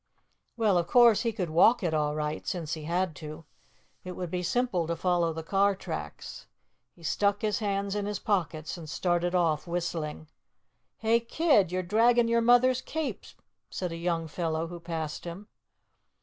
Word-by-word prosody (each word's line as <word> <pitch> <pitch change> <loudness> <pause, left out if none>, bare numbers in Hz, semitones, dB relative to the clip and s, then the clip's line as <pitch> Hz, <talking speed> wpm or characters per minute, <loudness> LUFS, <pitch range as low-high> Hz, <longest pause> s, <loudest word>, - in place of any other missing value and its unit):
Well, 210 -6 +3
of 170 - -2
course, 235 0 +6
he 230 - 0
could 185 -7 -3
walk 220 +8 +5
it 170 -3 0
all 150 -1 0
right, 150 0 -3
since 165 -4 -3
he 155 -2 -5
had 175 0 -1
to. 155 +1 -9 0.6
It 185 - -6
would 180 -2 -5
be 180 - -1
simple 185 -3 0
to 170 - -1
follow 175 -1 +1
the 160 0 -6
car 195 +4 +2
tracks. - - -7 0.5
He 170 - -18
stuck 200 +5 +1
his 210 -1 0
hands 200 -2 -1
in 205 -1 -2
his 210 -1 -2
pockets 175 -6 -2
and 160 -2 -9
started 175 +1 0
off 165 -3 +1
whistling. 165 -3 -3 0.7
"Hey, 225 +1 +2
kid, 235 - +2
you're 185 0 -1
dragging 230 +5 +3
your 235 0 +3
mother's 245 +2 +4
cape," 315 +2 -4 0.4
said 180 -2 -4
a - - -4
young 165 -1 -1
fellow 160 0 -2
who 175 0 -7
passed 165 -2 -5
him. 175 +5 -7
180 Hz, 175 wpm, -28 LUFS, 165-210 Hz, 0.7 s, course